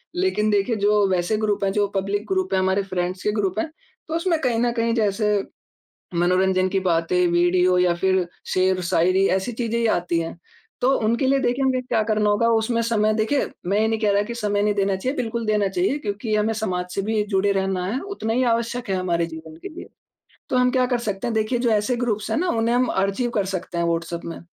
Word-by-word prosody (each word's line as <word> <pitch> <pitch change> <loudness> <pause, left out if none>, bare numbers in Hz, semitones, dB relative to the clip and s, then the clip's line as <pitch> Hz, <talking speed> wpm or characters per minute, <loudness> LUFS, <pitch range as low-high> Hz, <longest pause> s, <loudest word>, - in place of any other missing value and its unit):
लेकिन 355 - +1
देखिए 205 +3 +1
जो 210 0 +3
वैसे 185 +3 0
ग्रुप 210 -2 -1
हैं, 195 - +1
जो 205 +1 +1
पब्लिक 200 +2 -1
ग्रुप 375 - -1
हैं, 190 - +3
हमारे 190 +1 +1
फ्रेंड्स 185 -1 -3
के 210 - +1
ग्रुप 210 -1 -1
हैं, 315 - -2 0.4
तो 320 - -3
उसमें 335 -1 +1
कहीं 245 -4 +1
न 240 0 +2
कहीं 230 -1 0
जैसे 210 -2 +1 0.7
मनोरंजन 185 +2 +2
की 190 +1 0
बातें 180 0 +1
वीडियो 175 +1 +3
या 180 -1 +3
फिर 185 +1 +1 0.3
शेर-शायरी 185 0 +2
ऐसी 190 +6 -3
चीज़ें 230 0 -2
ही 230 - +1
आती 175 -5 +1
हैं, 165 +1 -5 0.4
तो 250 - +3
उनके 235 +4 +1
लिए 275 +1 +3
देखिए 255 +1 0
हमें 260 -1 +1
क्या 230 -3 0
करना 215 -1 +1
होगा 205 +3 +2
उसमें 230 +1 +1
समय 215 -2 +1
देखिए, 225 +6 +1 0.2
मैं 195 +3 +1
ये 220 - +2
नहीं 225 0 0
कह 210 -2 +2
रहा 200 +1 +3
कि 235 +3 -6
समय 205 -3 -1
नहीं 210 0 +1
देना 195 -1 +1
चाहिए, 255 +9 -3
बिल्कुल 235 -2 -2
देना 210 -2 +2
चाहिए 355 - 0
क्योंकि 215 -3 -3
हमें 215 +1 +1
समाज 185 -5 -2
से 195 - -1
भी 215 +1 0
जुड़े 200 -1 +1
रहना 190 -2 -1
है, 220 +7 -1
उतना 395 - -4
ही 250 +3 +1
आवश्यक 235 +1 -2
है 190 - +1
हमारे 170 -2 0
जीवन 160 -1 -10
के - - -5
लिए। - - -8 0.6
तो - - 0
हम 250 0 +3
क्या 255 0 +2
कर 245 -1 0
सकते 205 -4 -3
हैं 235 - -1
देखिए 220 +3 0
जो 240 -1 +1
ऐसे 215 +3 +1
ग्रुप्स 220 -4 -2
है - - 0
ना 365 - 0
उन्हें 230 -5 +1
हम 250 -1 +2
आर्चीव 200 +6 0
कर 205 - +1
सकते 180 -2 -4
हैं 170 - +1
व्हाट्सएप 170 0 -2
में। 165 - -6
210 Hz, 225 wpm, -22 LUFS, 190-235 Hz, 0.7 s, जो